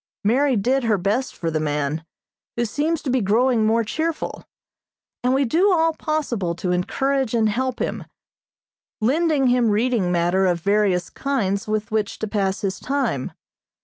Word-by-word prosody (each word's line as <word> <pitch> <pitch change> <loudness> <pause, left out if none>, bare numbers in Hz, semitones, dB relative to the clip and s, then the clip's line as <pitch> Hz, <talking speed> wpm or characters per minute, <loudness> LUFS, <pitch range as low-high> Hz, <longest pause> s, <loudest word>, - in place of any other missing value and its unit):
Mary 260 +6 +3
did 250 +5 +1
her 215 -2 +2
best 210 +8 -1
for 165 -1 -3
the 155 - 0
man, 150 0 -1 0.5
who 235 - 0
seems 300 +7 -1
to 265 - -1
be 255 -1 +2
growing 225 +2 +2
more 230 +1 +2
cheerful, 320 +8 -3 0.8
and 250 - +2
we 270 +1 +2
do 350 - +3
all 325 -2 +3
possible 250 - -2
to 180 +1 -2
encourage 265 +8 0
and 220 -2 +3
help 255 +3 -1
him, - - -3 0.9
lending 290 +4 +2
him 245 -2 +3
reading 215 -3 +1
matter 175 +2 +2
of 175 -1 +1
various 200 -1 +1
kinds 200 -9 -1
with 215 0 -2
which 215 -2 -1
to 220 - -3
pass 195 -2 -1
his 190 -2 -2
time. 260 - -1
225 Hz, 160 wpm, -22 LUFS, 195-265 Hz, 0.9 s, Mary